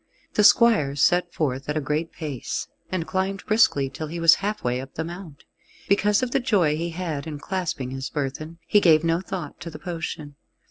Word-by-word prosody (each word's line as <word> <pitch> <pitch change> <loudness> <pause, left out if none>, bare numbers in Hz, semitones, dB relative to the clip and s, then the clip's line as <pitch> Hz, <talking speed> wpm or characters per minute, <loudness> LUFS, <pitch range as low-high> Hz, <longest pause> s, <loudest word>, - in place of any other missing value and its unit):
The 210 - +3
squire 205 - +5
set 175 +5 +2
forth 135 -4 -2
at 150 - 0
a - - +2
great 150 +3 -2
pace, 145 -6 -5 0.2
and 185 -3 -1
climbed 190 +2 -2
briskly 215 -11 +3
till 150 +4 -6
he 170 +3 -5
was 165 -1 +7
halfway 130 -12 -1
up 135 0 -11
the 160 - -2
mount. 170 -3 -9 0.4
Because 205 +3 +3
of 250 - -1
the 275 - +2
joy 195 - +2
he 170 +2 -3
had 165 -3 -4
in 150 -2 -5
clasping 155 -6 -3
his 135 +1 -4
burthen, 155 +3 -4
he 205 - +4
gave 160 -3 +5
no 165 +1 +1
thought 190 -1 -6
to 170 - -7
the 155 - -9
potion. 160 -3 -6
165 Hz, 195 wpm, -24 LUFS, 145-190 Hz, 0.4 s, was